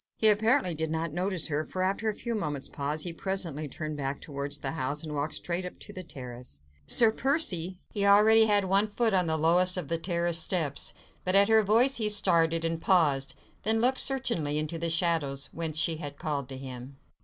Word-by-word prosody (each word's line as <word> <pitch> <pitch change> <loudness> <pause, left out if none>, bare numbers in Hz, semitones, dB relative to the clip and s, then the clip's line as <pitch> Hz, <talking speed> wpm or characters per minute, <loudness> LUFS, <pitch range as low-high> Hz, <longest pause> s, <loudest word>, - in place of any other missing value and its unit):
He 220 - +6
apparently 220 -1 +2
did 160 0 -3
not 160 0 -3
notice 180 0 0
her, 150 +1 -1
for, 185 +3 -4
after 200 +4 -1
a 210 - -4
few 235 +1 -5
moments' 150 -10 -3
pause, 145 +2 -3
he 175 - -3
presently 165 -5 -2
turned 155 +2 -6
back 140 0 -4
towards 140 0 -4
the 135 - -2
house, 150 -1 -2
and 155 -2 -6
walked 145 +1 -3
straight 175 +1 -2
up 180 - -8
to - - -12
the 185 - -6
terrace. 125 - -8 0.3
"Sir 230 -2 +6
Percy!" 190 - +1 0.2
He 205 - -2
already 215 +2 +5
had 205 -2 +2
one 195 +3 +2
foot 220 +1 -1
on 180 -2 +2
the 160 0 0
lowest 180 +4 +2
of 165 -6 -5
the 165 - -1
terrace 170 -1 +1
steps, 160 -5 -1 0.3
but 185 +1 0
at 200 +2 +5
her 220 0 +5
voice 230 +6 +3
he 215 -2 0
started, 165 -5 +4
and 165 0 -2
paused, 150 -8 +1 0.3
then 220 +2 +1
looked 255 +3 +2
searchingly 230 - 0
into 155 +2 -3
the 170 0 -1
shadows 160 -5 -1
whence 160 -2 -4
she 160 0 +1
had 145 -3 -7
called 145 -4 -4
to 135 - -7
him. 130 0 -9
170 Hz, 210 wpm, -28 LUFS, 150-200 Hz, 0.3 s, He